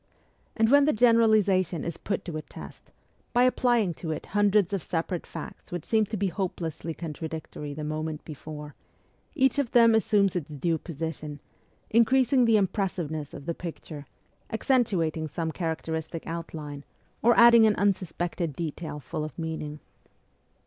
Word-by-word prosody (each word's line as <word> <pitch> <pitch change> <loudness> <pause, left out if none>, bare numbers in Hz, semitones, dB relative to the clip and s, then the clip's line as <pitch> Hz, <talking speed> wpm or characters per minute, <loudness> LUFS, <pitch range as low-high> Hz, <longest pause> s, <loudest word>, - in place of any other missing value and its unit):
And 225 -1 +4
when 285 0 +7
the 305 - +3
generalization 215 -7 +3
is 170 -1 -4
put 200 - -3
to 170 -4 -5
a 155 - -3
test, - - -12 0.4
by 245 +1 +5
applying 240 -6 +3
it - - -10
to 160 -3 -3
hundreds 205 -2 +3
of 195 - 0
separate 170 +1 -3
facts - - -9
which 175 -2 -4
seemed 220 -2 +2
to 220 - -3
be 195 0 0
hopelessly 170 -3 -4
contradictory 155 -2 -6
the 155 - -5
moment 155 0 -4
before, 150 -1 -8 0.6
each 265 +1 +3
of 270 -5 -1
them 230 -1 +7
assumes 205 -3 +3
its 165 -5 -3
due 160 +3 -1
position, 155 -2 -6 0.5
increasing 255 +3 +4
the 225 -1 +5
impressiveness 175 -7 -2
of 140 - -10
the 170 - -1
picture, 155 -4 -8 0.4
accentuating 190 - +1
some 160 +2 -3
characteristic 160 -1 -4
outline, 155 -4 -6 0.4
or 235 +1 +4
adding 235 -1 +8
an 210 - +3
unsuspected 175 -5 -1
detail 160 -1 -5
full 145 +3 -5
of 155 - -7
meaning. 160 -2 -5
170 Hz, 150 wpm, -27 LUFS, 155-215 Hz, 0.6 s, adding